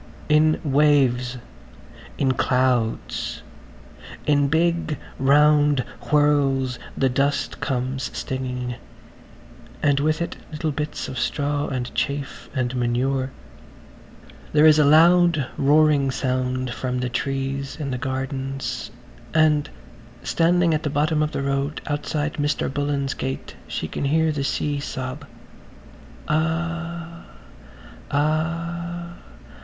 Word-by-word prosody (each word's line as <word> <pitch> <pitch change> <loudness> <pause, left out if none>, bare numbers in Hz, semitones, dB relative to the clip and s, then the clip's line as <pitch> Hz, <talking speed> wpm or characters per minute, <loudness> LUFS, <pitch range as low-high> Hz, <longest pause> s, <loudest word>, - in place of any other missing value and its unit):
In 155 +1 +4
waves, 135 -4 +3 0.8
in 135 -2 +2
clouds, 125 -3 0 0.8
in 145 -1 +3
big 165 0 +1 0.2
round 145 0 +4 0.3
whirls 140 -4 +2 0.2
the 135 - +3
dust 140 +2 0
comes 130 0 -2
stinging, 125 -2 -4 1.1
and 145 -2 +3
with 155 +2 +1
it 170 - -3
little 155 0 -2
bits 150 +1 -4
of 130 -2 -5
straw 145 +2 -1
and 125 -2 -4
chaff 140 0 -3
and 130 -1 -1
manure. 130 +2 0 1.2
There 150 +1 +6
is 155 -1 +7
a 150 - +5
loud 165 0 +5
roaring 145 -1 +4
sound 130 -1 -1
from 125 0 -3
the 125 0 -1
trees 135 +1 -2
in 140 -3 -3
the 125 - -3
gardens, 135 -1 -3 0.5
and 155 -2 +3 0.5
standing 170 0 +3
at 155 - 0
the 155 - -2
bottom 150 +2 +1
of 155 0 0
the 140 - -2
road 140 +2 -1
outside 145 0 -2
Mr. 145 -2 0
Bullen's 140 -2 -1
gate 135 0 -5
she - - -3
can - - -3
hear 160 +3 +2
the 145 -2 -2
sea 145 +1 -1
sob: 130 +1 -5 1.0
"Ah!... 170 +1 -2 0.8
Ah! 170 +3 -1
145 Hz, 110 wpm, -23 LUFS, 130-155 Hz, 1.2 s, is